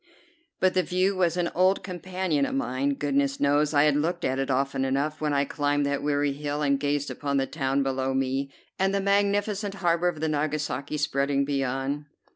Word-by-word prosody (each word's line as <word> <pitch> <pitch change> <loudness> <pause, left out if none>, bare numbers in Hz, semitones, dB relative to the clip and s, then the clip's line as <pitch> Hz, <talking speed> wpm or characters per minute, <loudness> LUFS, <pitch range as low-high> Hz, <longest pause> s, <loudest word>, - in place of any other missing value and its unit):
But 185 0 +3
the 185 - +3
view 185 +2 +1
was 175 -2 +1
an 175 -1 0
old 185 +2 +3
companion 185 -4 -2
of - - -3
mine; 135 +1 0
goodness 140 -1 0
knows 145 +1 +2
I 145 -1 +4
had 150 -2 +3
looked 170 +4 -1
at 130 +1 0
it 135 - -1
often 135 0 0
enough 140 +4 -1
when 150 -1 0
I 140 0 +2
climbed 145 0 0
that 140 0 -1
weary 145 -1 +1
hill 145 +1 -3
and 140 -1 +2
gazed 145 0 -1
upon 140 -1 -2
the 135 - +2
town 135 -1 -1
below 135 0 -1
me, 135 +1 -1 0.3
and 195 +1 +2
the - - +2
magnificent 200 +1 +1
harbor 175 -2 +1
of 175 -3 -1
Nagasaki 150 -1 -2
spreading 140 -1 +1
beyond. 135 +1 -2
145 Hz, 190 wpm, -26 LUFS, 140-175 Hz, 0.3 s, I